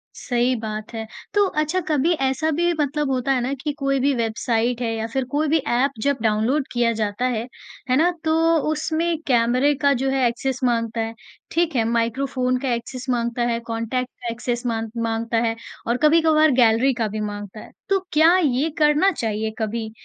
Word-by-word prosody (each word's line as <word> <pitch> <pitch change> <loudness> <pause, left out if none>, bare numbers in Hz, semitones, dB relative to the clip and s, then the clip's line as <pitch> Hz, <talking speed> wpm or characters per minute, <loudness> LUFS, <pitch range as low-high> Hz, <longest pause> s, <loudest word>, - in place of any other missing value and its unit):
सही 245 0 0
बात 215 -1 -6
है। 225 -1 -4 0.3
तो 410 -1 +4 0.2
अच्छा 310 +5 0
कभी 305 +3 +2
ऐसा 290 +4 0
भी 345 0 +3
मतलब 295 0 0
होता 255 +1 0
है 260 -2 +2
ना 255 +3 -1
कि 300 - -1
कोई 275 -1 +1
भी 280 +2 +2
वेबसाइट 230 +1 -1
है 230 -2 -1
या 225 0 -3
फिर 265 -1 0
कोई 300 +2 +1
भी 315 +2 +3
ऐप 255 +4 +2
जब 280 +1 +1
डाउनलोड 225 +6 +1
किया 240 -1 +2
जाता 210 +3 -1
है, 235 -3 -1 0.5
है 255 - +4
ना, 330 +4 +4
तो 315 - +1 0.4
उसमें 320 +2 -1
कैमरे 250 +3 +3
का 280 -1 +4
जो 270 - +1
है 265 -1 +1
एक्सेस 255 +2 -2
माँगता 230 -2 0
है, 225 0 -3 0.4
ठीक 335 -3 0
है, 235 - +3
माइक्रोफ़ोन 255 +2 0
का 250 -2 -1
एक्सेस 240 +2 -5
माँगता 240 -1 -1
है, 230 -1 0
कॉन्टैक्ट 235 +2 -3
का 245 - -5
एक्सेस 240 +1 -3
माँग 225 -2 -2
माँगता 230 0 -1
है 225 - -1 0.3
और 235 - +1
कभी-कभार 315 -1 +5
गैलरी 235 +4 +4
का 230 -3 -1
भी 215 +1 -5
माँगता 205 0 -6
है। - - -12 0.2
तो 390 -1 +3
क्या 320 +3 +6
ये 295 -2 +1
करना 305 +5 +4
चाहिए 220 - -2
कभी? 220 0 -3
250 Hz, 190 wpm, -22 LUFS, 230-285 Hz, 0.5 s, क्या